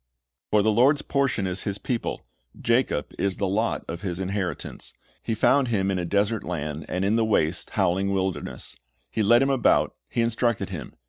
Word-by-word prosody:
"For 105 -1 +3
the 110 - +3
Lord's 130 +7 +4
portion 135 -8 0
is 90 0 -2
His 100 -1 -3
people; 115 +4 -3 0.3
Jacob 115 - +1
is 100 -2 0
the 100 - 0
lot 110 +4 0
of 85 +1 -5
His 90 -3 -3
inheritance. 95 -3 -4 0.3
He 115 - -2
found 135 +4 +3
him 100 -4 +1
in 95 - 0
a 90 - -2
desert 100 +4 +1
land, 75 -3 -4
and 90 +1 -1
in 105 +3 +2
the 115 - +3
waste, 90 -6 +1
howling 95 +3 +2
wilderness; 95 -1 -3 0.4
He 110 - -1
led 120 +5 +5
him 135 - +2
about, 135 -2 +3 0.2
He 120 - 0
instructed 115 0 0
him. - - -7
100 Hz, 185 wpm, -25 LUFS, 95-115 Hz, 0.4 s, led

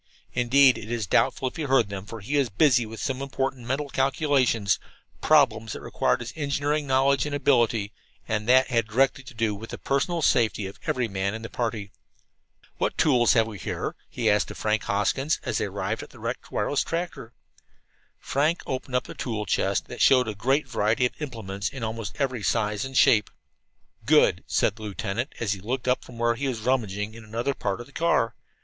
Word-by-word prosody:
Indeed, 130 +2 +5
it 110 - -9
is 115 -3 -2
doubtful 130 - +2
if 130 - -6
he - - -3
heard 135 -7 +2
them, 100 0 -6
for 115 -1 -8
he 130 +9 -3
was 140 -4 +2
busy 125 +1 +3
with 110 +1 -9
some 135 -1 -2
important 135 -2 -3
mental 140 +3 -1
calculations 135 -6 +1 0.4
problems 115 -8 +3
that - - -7
required - - 0
his 120 +1 -6
engineering 145 0 -1
knowledge 135 +2 +3
and 145 - -2
ability, 120 -7 +2 0.3
and 105 +1 -2
that 130 +1 +6
had 115 -3 +1
directly 130 +4 +1
to 130 - -12
do 110 -2 0
with 110 +3 -8
the - - -6
personal 155 +5 -1
safety 110 -6 +2
of 95 - -8
every 125 -2 0
man 100 0 -2
in 110 - -7
the 115 - -7
party. 110 -4 -3 0.9
"What - - -1
tools 125 -6 +4
have 115 -1 +4
we 110 -3 -8
here?" - - -4
he - - -2
asked - - +3
of - - -8
Frank 110 -1 0
Hoskins, 135 +9 0
as - - -1
they - - 0
arrived - - -3
at - - -10
the - - -16
wrecked - - -5
wireless 145 - 0
tractor. 165 -9 -4 0.8
Frank 150 +5 0
opened 130 0 -4
up 125 - 0
a - - -7
tool 110 -3 -3
chest - - 0
that - - -7
showed 125 -3 +5
a 110 - -2
great 135 +8 +1
variety 115 0 +1
of 125 - -1
implements 105 -8 -4
in 135 -4 -7
almost 110 -1 -4
every 130 -5 -1
size 105 -1 0
and 135 -1 -4
shape. 105 -3 +5 0.8
"Good," - - +4
said 105 - +1
the - - -12
lieutenant, 105 +4 -3
as 105 -3 0
he 100 - -7
looked 125 +6 -3
up 125 - +1
from 120 - -13
where 120 0 +2
he 135 +4 -3
was 120 -4 -3
rummaging 110 -4 -1
in 115 0 -11
another 115 +5 -2
part 100 -6 -3
of 120 - -7
the 135 - -19
car. 165 -9 +1
120 Hz, 205 wpm, -26 LUFS, 110-135 Hz, 0.9 s, that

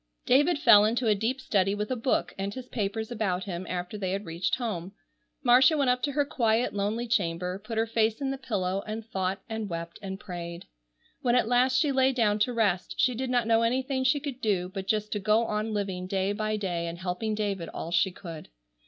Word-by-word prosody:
David 290 +6 +4
fell 210 -8 +7
into 235 +3 +1
a 215 - +5
deep 225 +6 -1
study 195 -5 +1
with 210 +3 -3
a - - +1
book 245 +2 0
and 195 +1 -3
his 255 +2 -8
papers 220 0 -3
about 195 -5 -1
him, 180 -1 -5
after 180 +3 -4
they 190 -2 -1
had 200 +2 -3
reached 165 +2 -1
home. 195 -7 -4 0.5
Marcia 260 +5 +6
went 275 -3 +3
up 250 0 0
to 285 0 -1
her 290 0 +2
quiet, 235 -3 +1
lonely 210 +4 -1
chamber, 180 -4 -1
put 225 +1 -5
her 225 - +3
face 225 -1 +1
in 275 -1 -1
the 270 - -3
pillow 195 -6 -2
and 215 +1 -5
thought 190 -2 -2
and 220 -2 -4
wept 170 0 -6
and 190 -1 -6
prayed. 175 -3 -7 0.6
When 245 -3 +2
at 245 - +3
last 250 +2 +3
she 300 -3 +2
lay 265 0 +3
down 215 -4 +2
to 230 +4 +2
rest 205 -6 0
she 255 -1 +3
did 255 +2 -3
not 245 -2 +2
know 225 0 +3
anything 260 +3 0
she 260 +3 +3
could 275 -3 -6
do 185 -4 0
but 190 0 -6
just 215 0 0
to 210 - -1
go 215 +3 +3
on 215 0 -2
living 195 -3 -3
day 195 +1 0
by 215 +1 -1
day 175 -4 -2
and 170 0 -5
helping 185 +4 -2
David 200 -5 -2
all 165 - -6
she 175 +2 +3
could. 170 -4 -9
215 Hz, 225 wpm, -28 LUFS, 190-245 Hz, 0.6 s, fell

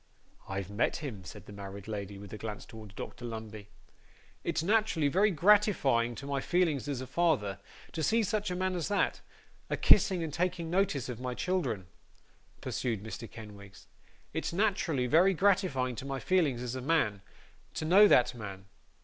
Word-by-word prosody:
'I've 95 0 -4
met 105 +3 +1
him,' 125 -11 -6
said 85 - -10
the 105 - -11
married 100 0 -8
lady, 100 -2 -5
with 100 0 -10
a - - -5
glance 105 -2 -6
towards 110 -3 -12
Dr 120 - -7
Lumbey. 110 -3 -7 0.7
'It's 160 - -1
naterally 200 -6 +2
very 200 +6 +4
gratifying 170 - +3
to 140 - -8
my 140 -1 -1
feelings 165 -6 +1
as 135 -3 -2
a - - -5
father, 130 - +1 0.3
to 165 - -4
see 225 +10 +3
such 210 0 -1
a 180 - -2
man 185 +1 0
as 175 -4 -2
that, 205 -1 0 0.5
a - - -1
kissing 185 -4 +5
and 155 -3 -4
taking 170 -1 -1
notice 175 -8 +1
of 125 -2 -6
my 125 -1 -3
children,' 130 - -1 0.8
pursued 115 -5 -2
Mr 110 +1 -7
Kenwigs. 100 -3 -12 0.5
'It's - - -2
naterally 170 -8 +1
very 180 +8 +5
gratifying 160 -10 +2
to 130 - -6
my 135 -1 -3
feelings 150 -10 +1
as 125 -1 -4
a 130 - -4
man, 125 -9 +1 0.5
to 155 - -2
know 195 +6 +7
that 125 -8 +5
man. 100 -5 -8
135 Hz, 175 wpm, -31 LUFS, 110-180 Hz, 0.8 s, know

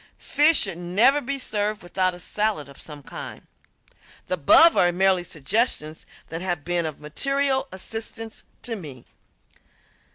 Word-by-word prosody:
Fish 300 +2 +3
should 190 -4 -1
never 210 +12 +3
be 275 +2 -3
served 210 -5 -1
without 185 +1 0
a - - -11
salad 205 -4 -2
of 140 - -12
some 150 -2 -10
kind. - - -9 0.8
The - - -3
above 185 - +6
are 175 - +4
merely 185 0 +2
suggestions 160 - -1 0.2
that 165 +1 -5
have 175 -5 -2
been 175 -1 0
of 155 - -7
material 275 - 0
assistance 225 +3 -6 0.2
to 235 -2 -2
me. 145 - -10
185 Hz, 140 wpm, -24 LUFS, 165-230 Hz, 0.8 s, above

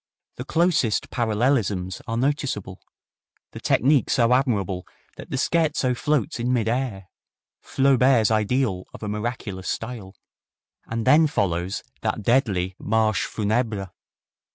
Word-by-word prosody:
The - - -6
closest 165 - +1
parallelisms 110 -5 0
are 115 - -2
noticeable, 125 -8 -2 0.7
the - - -8
technique 140 +2 +3
so 120 0 +3
admirable 100 -9 0 0.3
that - - -10
the 135 - -2
scherzo 150 -3 +1
floats 145 -4 -1
in 120 +2 0
mid 115 -3 +1
air 115 -5 -2 0.6
Flaubert's 130 -4 +3
ideal 110 -3 0
of - - -11
a - - -3
miraculous 105 -3 -4
style. 110 -5 -5 0.7
And 115 0 -3
then 150 +5 +6
follows 95 - -1 0.2
that 110 - -2
deadly 95 -7 +1
Marche 110 -2 +1
Funebre! 105 -3 -1
115 Hz, 120 wpm, -24 LUFS, 100-130 Hz, 0.7 s, then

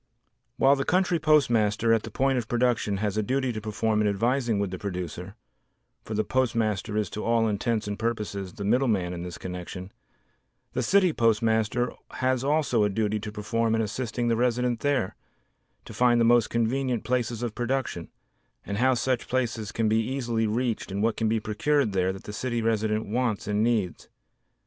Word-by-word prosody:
While 135 +1 +5
the 135 - -1
country 180 0 +2
postmaster 115 -8 +3
at 115 - +2
the 110 - -8
point 135 +3 +1
of 115 - -5
production 120 -4 +1
has 105 0 -2
a - - +3
duty 130 +3 0
to 110 - -5
perform 110 0 0
in 105 - +2
advising 115 +3 +1
with 100 -2 -1
the 95 - -5
producer 90 0 -5 0.7
(for 110 - -5
the 110 - +1
postmaster 110 -4 0
is 105 -2 +1
to 105 - -5
all 115 -1 +2
intents 110 +1 -1
and 105 0 -4
purposes 105 -5 -3
the 105 - -6
"middleman" 105 -5 +1
in 85 - -5
this 90 0 -6
connection) 90 +1 -7 0.8
the 125 - 0
city 185 +5 +3
postmaster 115 +1 +1 0.2
has 130 -1 0
also 140 -6 +2
a 105 - +2
duty 105 +1 0
to 105 0 -6
perform 115 +2 0
in 115 - +1
assisting 120 +2 -2
the 115 - +2
resident 125 0 +1
there 140 -9 0 0.7
to - - -10
find 120 -1 +3
the 115 - +4
most 120 -1 +4
convenient 120 +1 0
places 120 -2 -1
of 120 -3 -2
production 120 -8 -2 0.6
and 100 +1 -3
how 130 +1 +4
such 125 0 -1
places 115 -4 -1
can 115 -1 0
be 110 +1 +3
easily 120 -2 -1
reached 115 -2 -1
and 100 +2 -1
what 115 0 +2
can 110 -1 0
be 110 0 +1
procured 110 +4 +1
there 95 0 +1
that 95 - -9
the 105 - -8
city 120 +1 -2
resident 110 -1 0
wants 115 0 -1
and 105 0 +1
needs. 110 -6 -1
115 Hz, 185 wpm, -26 LUFS, 105-125 Hz, 0.8 s, While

